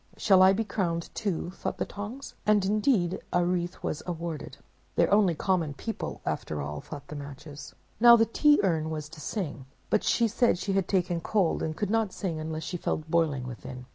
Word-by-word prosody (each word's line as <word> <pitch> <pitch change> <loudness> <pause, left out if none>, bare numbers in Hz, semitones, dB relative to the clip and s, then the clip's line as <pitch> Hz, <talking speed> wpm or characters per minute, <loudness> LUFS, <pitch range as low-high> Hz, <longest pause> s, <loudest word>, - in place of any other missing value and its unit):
'Shall 190 -3 +5
I 190 0 +8
be 210 +4 +1
crowned 175 -5 -2
too?' 180 -4 -2
thought - - -4
the - - -1
Tongs; 215 +7 -7
and 210 -2 +4
indeed 200 -3 +2
a 175 0 +2
wreath 175 0 -2
was 155 - -2
awarded. 170 -3 -5 0.4
"'They're - - +3
only 200 -5 +4
common 165 -4 0
people, 225 +9 -5
after 75 - -2
all!' 75 +1 -4
thought 145 -2 -9
the 150 - -6
Matches. 145 0 -9 0.2
"Now 235 +1 +9
the 225 -1 +4
Tea 295 +6 +4
Urn 160 -4 +1
was 155 -1 -4
to 155 -1 -11
sing; 150 - -4 0.2
but - - +3
she 235 - +3
said 230 -1 +2
she 195 +2 -2
had 195 -2 +1
taken 175 -3 0
cold 190 -2 +1
and 155 0 -3
could 205 -2 -1
not 225 -3 +1
sing 170 -5 -3
unless 155 0 -4
she 180 - -4
felt 155 -1 -3
boiling 155 -6 +1
within. 125 +1 -8
175 Hz, 200 wpm, -28 LUFS, 155-205 Hz, 0.4 s, Now